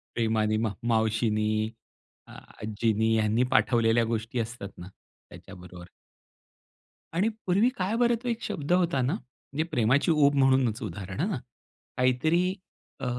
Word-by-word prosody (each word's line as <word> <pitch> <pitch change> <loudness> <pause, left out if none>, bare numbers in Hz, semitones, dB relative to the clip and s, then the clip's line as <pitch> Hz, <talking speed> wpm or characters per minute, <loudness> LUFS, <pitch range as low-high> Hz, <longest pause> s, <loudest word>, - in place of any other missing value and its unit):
प्रेमाने 110 -2 +1
मा 110 -2 -1
मावशीनी, 110 -1 +1 0.8
आजींनी 110 +1 -2
यांनी 110 +2 +2
पाठवलेल्या 115 +1 +3
गोष्टी 115 +1 -3
असतात 115 -3 -5
ना 90 - -9 0.4
त्याच्याबरोबर. 90 -2 -12 1.3
आणि 190 +6 +2 0.2
पूर्वी 200 +7 +3
काय 190 +4 -1
बरं 240 0 +3
तो - - -5
एक 230 0 -2
शब्द 145 +2 -4
होता 170 -7 +2
ना, 130 +7 0
म्हणजे 145 - -6
प्रेमाची 130 +4 +2
ऊब 145 -2 +4
म्हणूनच 130 -3 +2
उदाहरण 100 0 -6
हं, 185 -4 -1 0.6
काहीतरी 130 +7 +2 0.6
अ, - - -4
120 Hz, 125 wpm, -27 LUFS, 110-150 Hz, 1.3 s, ऊब